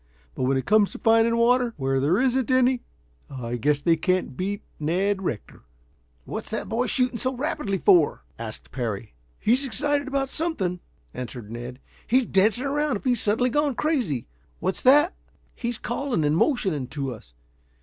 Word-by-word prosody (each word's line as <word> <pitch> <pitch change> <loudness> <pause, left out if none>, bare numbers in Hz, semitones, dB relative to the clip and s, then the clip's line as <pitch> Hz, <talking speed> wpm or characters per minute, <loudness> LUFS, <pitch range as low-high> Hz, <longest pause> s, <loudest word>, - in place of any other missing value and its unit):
But 125 - -2
when 135 +1 +2
it 130 - -2
comes 210 -1 +4
to - - -7
finding 225 +1 +3
water 240 0 +3
where 135 -1 0
there 150 +8 +2
isn't 260 -1 +1
any, 255 -1 +3 0.5
I 120 -3 -5
guess 145 +4 +1
they 165 +2 +4
can't 185 -5 0
beat 200 +6 -3 0.2
Ned 190 +6 0
Rector." 120 - -5 0.6
"What's - - -6
that - - -3
boy 230 +4 0
shooting 250 -2 +1
so 260 0 -1
rapidly 260 -7 -2
for?" 170 -4 +4 0.2
asked 110 -2 -8
Parry. 115 -4 -4 0.3
"He's 245 +5 +2
excited 285 +4 -1
about 270 -1 -1
something," 205 - -2 0.3
answered 120 -3 -7
Ned. 120 +2 -7 0.3
"He's 255 +2 +3
dancing 215 +6 +2
around 290 +1 0
as - - 0
if - - -14
he's 245 -4 +1
suddenly 235 +4 +1
gone 295 -1 +1
crazy. 245 - 0 0.3
What's 185 - -2
that? 295 +7 +5 0.4
He's 235 -1 -4
calling 240 - -1
and 150 +1 +2
motioning 180 - +1
to 135 -1 -4
us. - - -15
210 Hz, 170 wpm, -25 LUFS, -, 0.6 s, that